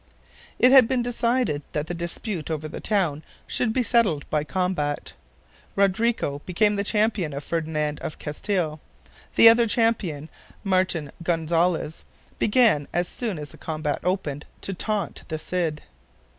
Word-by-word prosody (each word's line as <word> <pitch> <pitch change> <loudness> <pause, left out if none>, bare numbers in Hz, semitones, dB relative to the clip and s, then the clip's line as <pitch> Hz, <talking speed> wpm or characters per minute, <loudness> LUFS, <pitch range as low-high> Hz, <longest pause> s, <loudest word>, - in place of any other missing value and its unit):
It 250 - +5
had 265 -4 +8
been 250 -1 0
decided 240 - 0
that 150 0 -1
the 175 - -5
dispute 170 +1 -3
over 155 -1 -3
the 155 - -7
town 175 -9 0 0.2
should 245 -3 0
be 250 +2 +1
settled 215 - +2
by 150 -1 +1
combat. 180 -4 -2 0.6
Rodrigo 200 -6 +1
became 205 +3 +2
the 200 - 0
champion 210 -7 0
of 140 +1 -5
Ferdinand 155 -2 -2
of - - -6
Castile. 155 0 -2 0.6
The - - +9
other 230 +1 +7
champion, 210 -10 0 0.4
Martin 185 -6 +1
Gonzalez, 165 -1 0 0.4
began, 215 - +3
as 175 +1 0
soon 220 -4 -3
as 150 -1 -7
the - - -15
combat 155 -2 -2
opened, 160 -6 -2
to 195 - -4
taunt 205 0 -2
the 155 - -3
Cid. 160 -2 -2
175 Hz, 145 wpm, -24 LUFS, 155-215 Hz, 0.6 s, The